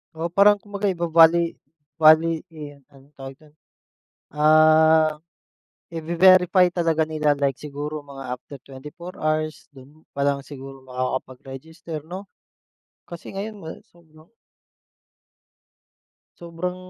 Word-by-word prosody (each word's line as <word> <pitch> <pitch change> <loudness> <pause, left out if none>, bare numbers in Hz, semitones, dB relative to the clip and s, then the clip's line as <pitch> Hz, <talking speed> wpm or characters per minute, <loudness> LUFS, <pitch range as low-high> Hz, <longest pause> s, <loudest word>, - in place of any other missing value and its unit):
Oo, 165 +2 -4
parang 205 +1 +6
kumbaga 205 0 -4
iva-vali 170 -1 +3 0.5
vali 160 +1 +5
eh, 150 -3 -11
ano 135 +1 -21
tawag 135 0 -9
dun 155 -1 -21 0.8
ah, 155 +1 +4 0.8
ive-verify 180 +2 +3
talaga 165 -2 0
nila 150 -2 0
like 135 -2 0
siguro 150 +1 -6
mga 135 -3 -7
after 140 +3 -12
24 150 +7 -11
hours 155 0 -2
dun 140 +4 -18
pa 140 - -3
lang 140 -1 -1
siguro 135 -1 -11
makakapag-register 135 +5 -6
'no? 190 +3 -9 0.8
Kasi 170 -1 -10
ngayon 205 +1 -7
wala 160 - -8 0.2
sobrang 160 -1 -22 2.1
Sobrang 170 +1 -5
155 Hz, 105 wpm, -22 LUFS, 145-170 Hz, 2.1 s, parang